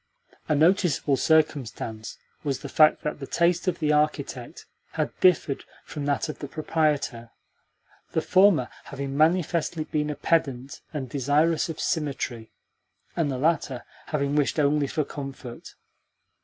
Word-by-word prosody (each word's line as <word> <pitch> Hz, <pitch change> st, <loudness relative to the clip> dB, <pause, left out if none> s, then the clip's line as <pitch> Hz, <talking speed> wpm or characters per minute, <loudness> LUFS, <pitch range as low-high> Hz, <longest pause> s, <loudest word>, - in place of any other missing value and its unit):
A 155 Hz, -, +3 dB
noticeable 160 Hz, -3 st, +3 dB
circumstance 130 Hz, -7 st, 0 dB, 0.3 s
was 140 Hz, -3 st, -2 dB
the 140 Hz, -, -7 dB
fact 155 Hz, +2 st, +4 dB
that 150 Hz, -, -3 dB
the 135 Hz, -, -6 dB
taste 170 Hz, +2 st, +1 dB
of 175 Hz, -2 st, +1 dB
the 150 Hz, -2 st, +1 dB
architect 150 Hz, -4 st, -1 dB, 0.3 s
had -, -, -1 dB
differed 165 Hz, -6 st, +3 dB, 0.2 s
from 145 Hz, -2 st, -5 dB
that 145 Hz, +2 st, 0 dB
of 155 Hz, -, -6 dB
the 145 Hz, -, -5 dB
proprietor 150 Hz, -6 st, -1 dB, 0.8 s
the 160 Hz, -, +2 dB
former 185 Hz, -9 st, +4 dB, 0.2 s
having 140 Hz, -1 st, -5 dB
manifestly 165 Hz, 0 st, +1 dB
been 150 Hz, -1 st, -2 dB
a 150 Hz, -, -3 dB
pedant 140 Hz, -4 st, -1 dB
and 145 Hz, -5 st, -4 dB
desirous 145 Hz, +6 st, +1 dB
of 160 Hz, -, -6 dB
symmetry, 135 Hz, -7 st, -2 dB, 0.6 s
and 160 Hz, -3 st, +1 dB
the 130 Hz, -, -2 dB
latter 140 Hz, -3 st, 0 dB, 0.2 s
having 140 Hz, -2 st, -1 dB
wished 145 Hz, +1 st, +1 dB
only 145 Hz, 0 st, +2 dB
for 150 Hz, +2 st, -1 dB
comfort. 135 Hz, -4 st, -8 dB
150 Hz, 140 wpm, -26 LUFS, 135-160 Hz, 0.8 s, fact